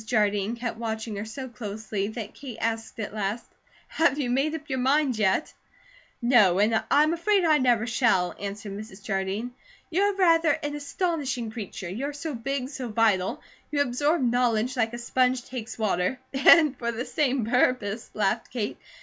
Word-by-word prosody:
Jardine 210 Hz, -1 st, +1 dB
kept 235 Hz, -2 st, -4 dB
watching 220 Hz, -1 st, -3 dB
her 205 Hz, -, -4 dB
so 260 Hz, +5 st, -6 dB
closely 215 Hz, -3 st, -4 dB
that 220 Hz, -1 st, -6 dB
Kate 265 Hz, -5 st, -9 dB
asked 225 Hz, 0 st, -3 dB
at 210 Hz, -, -4 dB
last: 210 Hz, +2 st, -2 dB, 0.4 s
"Have 320 Hz, -4 st, +2 dB
you 255 Hz, -5 st, -1 dB
made 280 Hz, +5 st, +1 dB
up 310 Hz, -1 st, -8 dB
your 265 Hz, -2 st, -2 dB
mind, 270 Hz, 0 st, +2 dB
yet?" 195 Hz, +7 st, +1 dB, 0.7 s
"No, 215 Hz, -7 st, +5 dB
and 220 Hz, +2 st, +2 dB
I 295 Hz, -, +5 dB
am 310 Hz, +2 st, +2 dB
afraid 380 Hz, +2 st, +2 dB
I 310 Hz, -2 st, +4 dB
never 240 Hz, -3 st, +3 dB
shall," 225 Hz, -7 st, +2 dB
answered 200 Hz, +1 st, -5 dB
Mrs. 200 Hz, -1 st, -9 dB
Jardine. 195 Hz, +4 st, -2 dB, 0.4 s
"You 355 Hz, +4 st, +1 dB
are 405 Hz, 0 st, +2 dB
rather 330 Hz, -5 st, +4 dB
an 290 Hz, 0 st, -2 dB
astonishing 285 Hz, -6 st, -2 dB
creature. 205 Hz, -4 st, -6 dB
You're 260 Hz, +11 st, -4 dB
so 295 Hz, +2 st, -5 dB
big, 260 Hz, +2 st, -3 dB
so 265 Hz, -3 st, -5 dB
vital; 210 Hz, -4 st, +1 dB, 0.3 s
you 290 Hz, -, -1 dB
absorb 285 Hz, +4 st, +1 dB
knowledge 245 Hz, 0 st, +1 dB
like 225 Hz, -2 st, 0 dB
a -, -, -4 dB
sponge 250 Hz, +1 st, +1 dB
takes 245 Hz, -3 st, -7 dB
water 210 Hz, +2 st, 0 dB
" -, -, -40 dB
"And 290 Hz, +1 st, +6 dB
for 235 Hz, -1 st, -2 dB
the 235 Hz, +2 st, -4 dB
same 270 Hz, -5 st, 0 dB
purpose," 230 Hz, -2 st, +1 dB
laughed 215 Hz, +2 st, 0 dB
Kate. 225 Hz, -5 st, -3 dB
240 Hz, 175 wpm, -26 LUFS, 215-275 Hz, 0.7 s, And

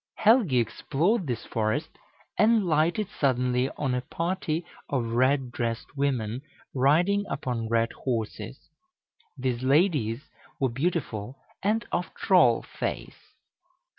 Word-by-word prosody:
Helgi 220 Hz, -, +4 dB
explored 155 Hz, -, 0 dB
this 120 Hz, -2 st, -3 dB
forest, 115 Hz, +8 st, -1 dB, 0.5 s
and 220 Hz, -1 st, +4 dB
lighted 170 Hz, +5 st, +2 dB
suddenly 125 Hz, -1 st, +2 dB
on 135 Hz, -4 st, -1 dB
a 125 Hz, -, 0 dB
party 165 Hz, +3 st, -2 dB, 0.2 s
of 130 Hz, -4 st, 0 dB
red 130 Hz, +1 st, +2 dB
dressed 115 Hz, +3 st, -3 dB
women 130 Hz, -4 st, -1 dB, 0.3 s
riding 170 Hz, +10 st, +3 dB
upon 125 Hz, -5 st, -3 dB
red 115 Hz, 0 st, +2 dB
horses. 115 Hz, -5 st, -3 dB, 0.8 s
These 125 Hz, -2 st, -1 dB
ladies 140 Hz, -, +2 dB, 0.3 s
were 135 Hz, -, +2 dB
beautiful 135 Hz, -, -2 dB, 0.2 s
and 215 Hz, +4 st, +1 dB
of -, -, -2 dB
troll -, -, +4 dB, 0.2 s
race. -, -, -5 dB
135 Hz, 110 wpm, -27 LUFS, 120-170 Hz, 0.8 s, Helgi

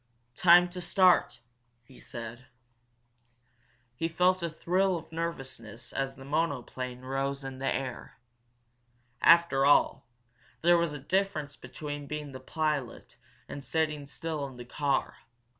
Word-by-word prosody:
"Time 175 Hz, +3 st, +7 dB
to 180 Hz, +1 st, -7 dB
start!" 180 Hz, -, +3 dB, 0.4 s
he 125 Hz, +2 st, -17 dB
said. 120 Hz, 0 st, -8 dB, 1.5 s
He 165 Hz, -, -1 dB
felt 180 Hz, +2 st, +2 dB
a 170 Hz, -, -1 dB
thrill 180 Hz, +3 st, +1 dB
of 160 Hz, -, -11 dB
nervousness 130 Hz, -8 st, -6 dB
as 135 Hz, 0 st, -2 dB
the 135 Hz, -, -12 dB
monoplane 130 Hz, -4 st, -2 dB
rose 135 Hz, +1 st, -2 dB
into 135 Hz, -1 st, -7 dB
the 135 Hz, -, 0 dB
air. 130 Hz, -3 st, -5 dB, 1.0 s
After 170 Hz, -5 st, +6 dB
all, 145 Hz, +1 st, +4 dB, 0.5 s
there 175 Hz, +1 st, +5 dB
was 170 Hz, -3 st, 0 dB
a -, -, -4 dB
difference 155 Hz, -2 st, -1 dB
between 145 Hz, +3 st, -7 dB
being 150 Hz, -1 st, -5 dB
the 130 Hz, -, -8 dB
pilot 150 Hz, -6 st, -3 dB, 0.3 s
and 140 Hz, -, -7 dB
sitting 155 Hz, -2 st, -1 dB
still 155 Hz, +1 st, -4 dB
in 130 Hz, -2 st, -12 dB
the 120 Hz, -, -8 dB
car. 140 Hz, +2 st, -1 dB
145 Hz, 130 wpm, -29 LUFS, 135-170 Hz, 1.5 s, Time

